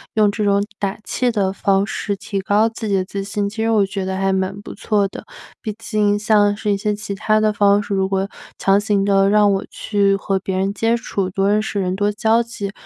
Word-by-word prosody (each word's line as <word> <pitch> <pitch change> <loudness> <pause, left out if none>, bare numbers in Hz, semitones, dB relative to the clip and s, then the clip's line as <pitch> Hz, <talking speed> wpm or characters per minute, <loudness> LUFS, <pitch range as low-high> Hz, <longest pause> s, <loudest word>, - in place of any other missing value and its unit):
用 210 -2 +4
这 210 0 -2
种 200 0 +3 0.2
打 195 -1 -2
气 250 -1 0
的 200 -4 0
方 195 0 +1
式 205 -1 -3
提 195 0 -4
高 205 +3 +2
自 225 -1 -6
己 200 - +1
的 185 - +1
自 200 0 -5
信。 200 0 -2
其 215 - -13
实 225 - +1
我 210 -3 +3
觉 195 -1 -4
得 190 0 -2
还 195 0 0
蛮 190 +1 -1
不 - - -9
错 205 -1 0
的， - - -9 0.4
毕 215 -4 -4
竟 210 -2 0
像 205 -1 +3
是 210 0 -2
一 200 - +1
些 210 +1 -1
其 210 -1 -6
它 215 +2 +1
的 215 0 +3
方 205 0 +3
式， 200 - -4
如 190 -1 +1
果 195 +1 -1 0.3
强 195 +1 +3
行 205 -1 +1
的 195 0 +3
让 210 -1 +4
我 195 0 -1
去 200 -2 +1
和 195 0 -1
别 190 0 -3
人 195 +1 0
接 225 +2 +1
触 195 -5 -3
多 195 +2 0
认 210 +1 +3
识 205 -2 -2
人 185 0 -2
多 205 +1 +1
交 225 +2 +2
际， 210 -4 -5
205 Hz, 260 characters per minute, -19 LUFS, 195-210 Hz, 0.4 s, 用